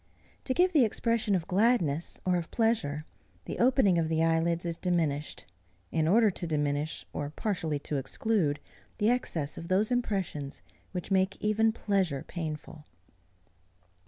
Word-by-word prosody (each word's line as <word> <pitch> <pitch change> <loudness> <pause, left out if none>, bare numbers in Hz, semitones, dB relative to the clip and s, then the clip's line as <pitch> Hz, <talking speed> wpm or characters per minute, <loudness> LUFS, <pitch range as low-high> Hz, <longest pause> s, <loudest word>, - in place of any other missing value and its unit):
To 260 - 0
give 360 +1 +3
the 295 -5 +6
expression 225 -1 +1
of 170 -3 -1
gladness 180 - +1
or 180 -1 +3
of 170 -2 -2
pleasure, 185 -11 0 0.4
the - - -5
opening 240 -8 +4
of 160 -1 0
the 160 0 +2
eyelids 165 +1 +1
is 170 -1 -2
diminished, 160 -5 -1 0.5
in 155 -1 +1
order 215 +4 +5
to 175 -1 -4
diminish, 150 0 -1
or 145 -1 -3
partially 160 -3 -2
to 150 - -3
exclude, 145 - 0 0.4
the 215 +1 +3
excess 165 - -1
of 170 - -8
those 200 +6 +2
impressions, 195 - -2 0.3
which 180 +1 -5
make 190 0 +2
even 220 +1 +2
pleasure 190 -10 0
painful. 155 -2 -6
175 Hz, 145 wpm, -29 LUFS, 155-215 Hz, 0.5 s, the